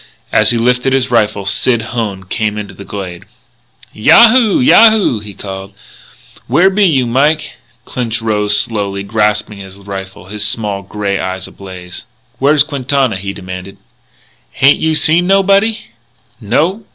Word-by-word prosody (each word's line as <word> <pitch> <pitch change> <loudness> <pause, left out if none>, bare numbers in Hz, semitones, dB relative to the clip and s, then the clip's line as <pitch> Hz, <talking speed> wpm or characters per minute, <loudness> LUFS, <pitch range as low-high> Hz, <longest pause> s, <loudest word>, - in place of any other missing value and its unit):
As 110 -1 +3
he 120 - +1
lifted 125 +3 +1
his 130 -2 0
rifle, 105 -4 +1
Sid 110 +4 0
Hone 105 -5 -3
came 105 +2 -3
into 105 -1 -6
the 100 - -11
glade. 95 -4 -7 0.7
"Yahoo! 230 - +5
Yahoo!" 220 - +5
he 105 -1 -10
called. 95 0 -8 0.7
"Where 190 +2 +3
be 200 +1 +2
you, 135 -7 +1
Mike?" 145 +6 0 0.3
Clinch 120 -3 -4
slowly 105 -2 -1
rose, 100 - -14
grasping 105 -1 0
his 95 0 -11
rifle, 95 -2 -8
his 105 +2 -6
small, 105 -2 -2
grey 100 0 -3
eyes 95 0 -4
ablaze. 90 -2 -10 0.3
"Where's 145 +1 +4
Quintana?" 135 -5 -1
he 100 +1 -5
demanded. 90 0 -9 0.8
"H'ain't 140 +2 +5
you 160 0 0
seen 165 +3 +3
nobody?" 195 +3 +3 0.6
"No." 160 - -1
110 Hz, 140 wpm, -14 LUFS, 100-140 Hz, 0.8 s, Yahoo